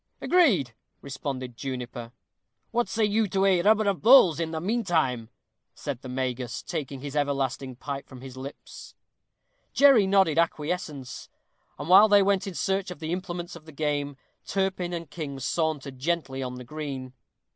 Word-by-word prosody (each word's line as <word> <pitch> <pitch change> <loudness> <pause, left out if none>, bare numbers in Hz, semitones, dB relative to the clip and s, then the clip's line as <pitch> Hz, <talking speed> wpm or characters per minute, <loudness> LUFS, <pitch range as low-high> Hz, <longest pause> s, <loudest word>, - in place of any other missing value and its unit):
"Agreed," 215 - +3 0.3
responded 135 -2 -5
Juniper. 125 -2 -6 0.6
"What 240 -3 0
say 215 +3 +1
you 210 +1 +1
to 195 0 +1
a 185 -3 +4
rubber 215 +2 +3
at 195 -2 0
bowls, 220 - +7
in 165 -1 -1
the 160 -1 -3
mean 225 +8 -1
time?" 130 - 0 0.5
said 140 -4 -5
the 130 - -8
Magus, 125 -2 -3
taking 135 -2 -5
his 145 0 -6
everlasting 135 -2 -1
pipe 140 +2 -6
from 130 -2 -11
his 130 -1 -10
lips. 135 +2 -10 0.8
Jerry 270 -8 +6
nodded 190 -5 +3
acquiescence. 155 -4 -3 0.5
And 145 - -6
while 190 +4 +8
they 205 -1 +6
went 195 0 +1
in 190 - -6
search 195 +1 -1
of 180 - -7
the 160 -1 -5
implements 175 -1 -4
of 165 -2 -13
the 160 - -11
game, 145 -2 -2 0.3
Turpin 190 -2 -1
and 170 -1 -5
King 145 -3 -6
sauntered 140 -2 -2
gently 140 -3 -2
on 125 -1 -4
the 125 - -8
green. 135 -2 -6
155 Hz, 165 wpm, -26 LUFS, 135-190 Hz, 0.8 s, while